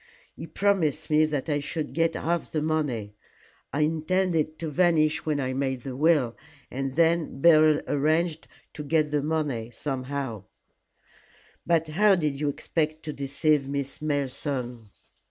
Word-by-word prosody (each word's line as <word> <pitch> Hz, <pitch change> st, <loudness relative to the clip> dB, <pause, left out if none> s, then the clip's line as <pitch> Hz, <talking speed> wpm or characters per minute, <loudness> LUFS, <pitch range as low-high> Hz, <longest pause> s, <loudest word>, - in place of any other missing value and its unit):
He -, -, -8 dB
promised 190 Hz, -9 st, 0 dB
me 155 Hz, +1 st, +5 dB
that 150 Hz, -3 st, -3 dB
I 145 Hz, -2 st, +1 dB
should 150 Hz, +1 st, -4 dB
get 165 Hz, 0 st, +1 dB
half 170 Hz, 0 st, -2 dB
the 155 Hz, -2 st, -1 dB
money. 140 Hz, -10 st, -1 dB, 0.6 s
I 145 Hz, -, -1 dB
intended 160 Hz, 0 st, 0 dB
to 160 Hz, -2 st, -4 dB
vanish 160 Hz, -2 st, +2 dB
when 150 Hz, -2 st, +1 dB
I 130 Hz, -1 st, -1 dB
made 130 Hz, -2 st, -2 dB
the 130 Hz, -2 st, -6 dB
will, 145 Hz, -5 st, +2 dB, 0.4 s
and 135 Hz, 0 st, -3 dB
then 165 Hz, -2 st, +2 dB
Beryl 155 Hz, -1 st, +5 dB
arranged 155 Hz, +3 st, 0 dB, 0.3 s
to 150 Hz, -, -6 dB
get 150 Hz, 0 st, +1 dB
the 150 Hz, -1 st, +1 dB
money 145 Hz, -7 st, -2 dB
somehow 130 Hz, -4 st, -4 dB, 0.6 s
" -, -, -30 dB
"But 165 Hz, -2 st, +2 dB
how 200 Hz, +5 st, +4 dB
did 150 Hz, -5 st, -1 dB
you 150 Hz, -1 st, 0 dB
expect 155 Hz, +2 st, -2 dB
to 150 Hz, -, -5 dB
deceive 140 Hz, +1 st, 0 dB
Miss 140 Hz, 0 st, -4 dB
Malleson?" 135 Hz, -5 st, -3 dB
150 Hz, 150 wpm, -26 LUFS, 135-160 Hz, 0.6 s, me